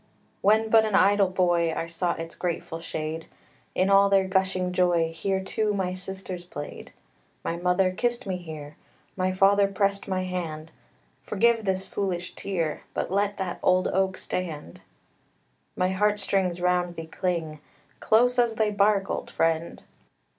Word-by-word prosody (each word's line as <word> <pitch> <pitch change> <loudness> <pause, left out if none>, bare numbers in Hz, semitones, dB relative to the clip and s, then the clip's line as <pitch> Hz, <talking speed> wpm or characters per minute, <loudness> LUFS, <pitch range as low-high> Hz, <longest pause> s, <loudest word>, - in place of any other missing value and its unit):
When 220 +2 +3
but 225 -1 +7
an 215 -2 0
idle 200 -1 +4
boy, 175 -3 +1
I - - -2
sought 170 +1 -2
its 165 0 -6
grateful 165 -2 -4
shade; 160 0 -5 0.5
In 190 +2 +2
all 200 0 +6
their 195 -1 +3
gushing 190 -1 0
joy 175 -3 +2
Here, 190 +3 -1
too, 210 +1 -1
my 185 -2 -1
sisters 185 -1 -6
played. 145 -4 -8 0.5
My 165 - -2
mother 180 +2 +2
kissed 240 +5 -1
me 190 -2 -2
here; 155 -4 -9 0.4
My 185 0 0
father 195 +2 +4
pressed 200 0 -1
my 185 -1 -1
hand 165 -4 -5 0.5
Forgive 230 +1 +2
this 190 0 0
foolish 180 -2 -3
tear, 170 -6 -3
But - - -2
let 200 +1 0
that 185 -2 -3
old 185 0 +3
oak 190 0 0
stand. 155 - -5 0.9
My 185 0 +1
heart 205 +2 +1
strings 190 -3 0
round 180 -1 +1
thee 165 - -6
cling, 165 -3 -3 0.4
Close 245 +3 +3
as 235 -2 +2
thy 215 -1 +1
bark, 200 -1 +2
old - - -4
friend! 165 0 -1
185 Hz, 155 wpm, -26 LUFS, 175-200 Hz, 0.9 s, but